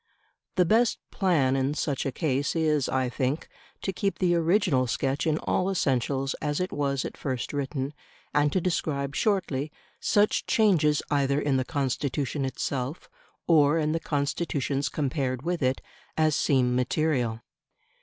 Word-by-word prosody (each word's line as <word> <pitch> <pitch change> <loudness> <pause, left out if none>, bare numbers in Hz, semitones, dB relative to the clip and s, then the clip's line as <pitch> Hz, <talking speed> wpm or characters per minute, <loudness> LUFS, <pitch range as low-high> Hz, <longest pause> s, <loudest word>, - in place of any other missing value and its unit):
The 180 - +4
best 225 +6 +3
plan 155 -9 +2
in 135 +2 0
such 140 -3 -1
a - - -1
case 140 -1 -1
is, 155 -4 +1
I 130 -1 +1
think, 130 +4 -2 0.4
to 195 - -1
keep 195 -1 -1
the 180 -2 +2
original 170 -6 +2
sketch 135 +6 -1
in 155 -1 +2
all 185 +3 0
essentials 135 -5 0
as 150 -1 -1
it 180 +1 -2
was 140 -2 -1
at - - -6
first 130 -3 -4
written, 140 0 -2 0.4
and 145 0 +3
to 185 - +2
describe 140 -6 -1
shortly 170 -9 0 0.3
such 205 0 +2
changes 165 -9 +3
either 140 -1 +2
in 145 -2 +1
the 130 - +1
Constitution 140 0 -1
itself, 135 +2 -4 0.3
or 150 -2 +4
in 155 -1 +1
the 165 - 0
Constitutions 145 -2 -1
compared 135 -3 -2
with 175 0 -1
it, 130 0 +1 0.4
as 155 -2 +3
seem 125 -3 +2
material. 125 -3 0
145 Hz, 150 wpm, -27 LUFS, 135-165 Hz, 0.4 s, The